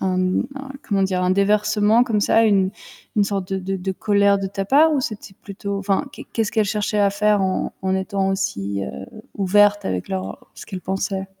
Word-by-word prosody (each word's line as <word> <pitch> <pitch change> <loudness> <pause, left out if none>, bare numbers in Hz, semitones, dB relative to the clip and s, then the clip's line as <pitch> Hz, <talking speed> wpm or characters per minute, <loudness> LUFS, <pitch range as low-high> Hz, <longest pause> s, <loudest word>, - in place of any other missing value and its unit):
un 185 -1 0 0.4
un 275 0 -8 0.2
comment 195 -2 +1
dire? 185 -1 -1
Un 180 - +2
déversement 210 +3 +3
comme 220 -4 0
ça, 225 +2 +4
une 195 -3 +3 0.5
une 205 - +4
sorte 195 -2 -3
de 190 - 0
de 190 +1 -3
de 190 +1 -3
colère 200 0 +2
de 195 - -3
ta 195 0 -4
part 305 +8 +5
ou 285 - +1
c'était 215 -5 -6
plutôt, 200 0 -5
enfin, 195 +6 0
qu'est - - -10
qu'est-ce 225 -2 -1
qu'elles 220 -2 +2
cherchaient 210 +1 -1
à 200 -1 +4
faire 210 +1 +2
en 185 0 -1
en 190 0 0
étant 195 0 -1
aussi, 100 - -2
heu, - - -7 0.3
ouvertes 205 +1 +3
avec 90 -1 -3
leur 95 0 -5
ce - - -11
qu'elles 190 -3 -6
pensaient? 190 +1 -3
200 Hz, 205 wpm, -21 LUFS, 190-210 Hz, 0.5 s, part